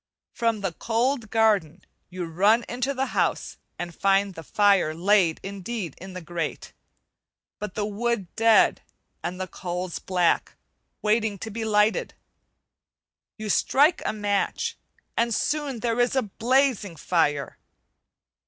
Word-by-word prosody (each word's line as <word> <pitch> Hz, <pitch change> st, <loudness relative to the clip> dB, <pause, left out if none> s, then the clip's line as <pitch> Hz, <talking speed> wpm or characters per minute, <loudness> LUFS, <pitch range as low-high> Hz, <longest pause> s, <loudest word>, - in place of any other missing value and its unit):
From 230 Hz, -3 st, 0 dB
the 195 Hz, -4 st, -2 dB
cold 230 Hz, -, -1 dB
garden, 200 Hz, -7 st, +2 dB, 0.3 s
you 180 Hz, -1 st, -5 dB
run 200 Hz, +8 st, +3 dB
into 250 Hz, +3 st, -2 dB
the 265 Hz, +1 st, 0 dB
house, -, -, 0 dB, 0.2 s
and 175 Hz, -1 st, -5 dB
find 195 Hz, +2 st, +2 dB
the 165 Hz, -, -8 dB
fire 190 Hz, +1 st, +3 dB
laid 180 Hz, -1 st, +3 dB
indeed 195 Hz, -, -5 dB
in 190 Hz, +1 st, -9 dB
the 185 Hz, -1 st, -7 dB
grate, 165 Hz, -1 st, -4 dB, 0.9 s
but 210 Hz, -3 st, -6 dB
the 210 Hz, -, -1 dB
wood 210 Hz, -2 st, -2 dB
dead 225 Hz, -1 st, +4 dB, 0.4 s
and 180 Hz, +1 st, -4 dB
the 185 Hz, -, -2 dB
coals 180 Hz, -1 st, -5 dB
black, 180 Hz, -2 st, +1 dB, 0.5 s
waiting 215 Hz, -1 st, +1 dB
to 220 Hz, +4 st, -7 dB
be 225 Hz, +2 st, -4 dB
lighted. 210 Hz, 0 st, +2 dB, 1.2 s
You 215 Hz, -1 st, -5 dB
strike 295 Hz, -, +3 dB
a -, -, 0 dB
match, 205 Hz, -2 st, -1 dB, 0.4 s
and 235 Hz, -1 st, +1 dB
soon 290 Hz, -6 st, -1 dB
there 235 Hz, 0 st, 0 dB
is 245 Hz, +2 st, +2 dB
a 265 Hz, -, +2 dB
blazing 230 Hz, -2 st, +1 dB
fire. 150 Hz, -3 st, 0 dB
205 Hz, 135 wpm, -25 LUFS, 180-230 Hz, 1.2 s, dead